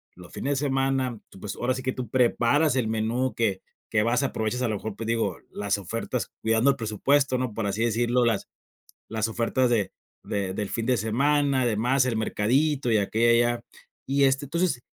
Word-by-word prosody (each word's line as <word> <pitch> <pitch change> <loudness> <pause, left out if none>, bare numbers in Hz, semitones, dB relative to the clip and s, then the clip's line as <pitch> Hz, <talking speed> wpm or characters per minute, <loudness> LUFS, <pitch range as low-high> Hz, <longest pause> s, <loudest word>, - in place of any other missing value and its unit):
los 90 0 -13
fines 140 0 -2
de 145 - -1
semana, 135 -3 0
tú, - - -15
pues, 100 0 -5
ahora 125 +1 0
sí 130 - -5
que 130 0 -1
tú 125 -3 -5
preparas 130 +4 +3
el 125 -4 +1
menú 115 +4 0
que 100 -5 0 0.3
que 105 - +2
vas 120 +5 +2
aprovechas 125 -2 -1
a 125 - +1
lo 110 - -1
mejor, 105 0 -5
pues, 110 +1 -6
digo 115 -6 0
las 100 0 -2
ofertas 115 +5 -4
cuidando 115 +4 +3
el 140 - +3
presupuesto, 130 +5 +1
¿no?, 125 -4 -3
por 115 - -2
así 100 +3 -1
decirlo 120 +2 +2
las 115 -4 0 0.6
las 110 0 -1
ofertas 120 +3 +1
de 105 -6 0 0.3
de 100 -2 -2
del 100 0 -3
fin 115 -1 -2
de 125 -1 +2
semana, 135 +5 +2
demás, 120 +4 +2
el 120 -3 0
mercadito 125 +5 +1
y 110 - +4
aquí 105 +2 -1
y 115 - +4 0.2
allá. 120 0 0 0.5
Y, 140 0 +3
este, 135 +1 +2
entonces 170 -3 0
120 Hz, 200 wpm, -26 LUFS, 110-130 Hz, 0.6 s, y